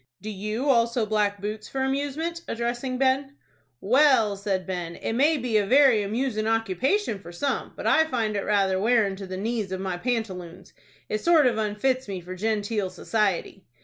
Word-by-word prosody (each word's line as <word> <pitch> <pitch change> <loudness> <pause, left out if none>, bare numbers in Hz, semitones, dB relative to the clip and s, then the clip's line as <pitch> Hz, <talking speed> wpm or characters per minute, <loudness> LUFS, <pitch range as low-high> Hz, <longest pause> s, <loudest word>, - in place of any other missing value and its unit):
"Do 215 - -6
you 215 +7 -3
also 235 -3 +3
black 210 -1 0
boots 210 +2 -5
for 265 - -3
amusement?" 285 +5 -2
addressing 240 +2 -2
Ben. 270 +1 +1 0.5
"Well," 245 -3 +4
said 195 -2 -2
Ben, 175 -3 -4
"it - - -4
may 295 +6 +3
be 240 -4 0
a 205 - +2
very 260 -3 +5
amoosin' 215 +1 -1
occupation 225 - 0
for 175 -3 -11
some, 270 +11 -2
but - - -7
I 320 - +4
find 230 -8 -1
it 200 - 0
rather 195 -2 +1
wearin' 215 -2 +2
to 195 -1 -7
the 185 0 -5
knees 215 -1 -2
of 190 - -3
my 190 -2 -3
pantaloons. 185 -6 -4 0.3
It 215 - -2
sort 335 -4 +5
of 235 -3 +2
unfits 220 +5 0
me 195 -2 -4
for 180 +1 -8
genteel 210 0 -1
society." 195 0 -1
220 Hz, 180 wpm, -25 LUFS, 195-260 Hz, 0.5 s, very